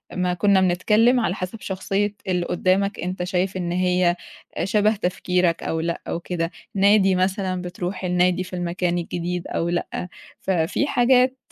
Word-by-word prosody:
ما 180 0 0
كنّا 190 +2 +3
بنتكلّم، 215 +7 +3
على 210 -5 0
حسَب 185 +4 -6
شخصية 195 +2 -2
اللي 180 -2 0
قُدّامك 195 +3 +1
أنت 180 +1 -3
شايف 185 +1 -1
إن 175 -2 -2
هي 180 -1 +2 0.5
شبه 210 +3 +2
تفكيرك 180 -2 0
أو 160 - -1
لأ 170 +1 -2
أو - - -2
كده، 170 -1 -3 0.2
نادي 195 -1 +4
مثلًا، 185 0 0
بترُوح 180 +1 -5
النادي 180 0 +2
في 185 0 -8
المكان 175 0 -1
الجديد 175 +1 -3
أو 170 - -1
لأ، 175 +1 -3 0.3
ففي 180 - 0
حاجات، 255 +1 +3
185 Hz, 150 wpm, -23 LUFS, 175-195 Hz, 0.5 s, نادي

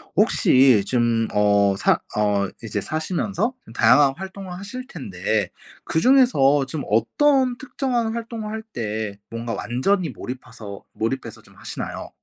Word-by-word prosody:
혹시 130 -5 +5
지금 115 -1 +1
어 100 -1 +3
사 - - +3 0.2
어 105 -2 +2 0.2
이제 105 -2 -3
사시면서 185 - -2
좀 - - -13
다양한 140 -2 +5
활동을 190 0 -8
하실텐데 170 - -3 0.3
그 160 - 0
중에서 165 - +4
좀 140 +1 -4
어떤 255 - +2
특정한 250 -4 -2
활동을 230 -2 -5
할 220 0 -5
때 110 -2 -3
뭔가 115 0 -4
완전히 165 - 0
몰입하서 120 -6 -8
몰입해서 120 +4 -3
좀 - - -21
하시나요? - - -6
135 Hz, 280 characters per minute, -22 LUFS, -, 0.3 s, 혹시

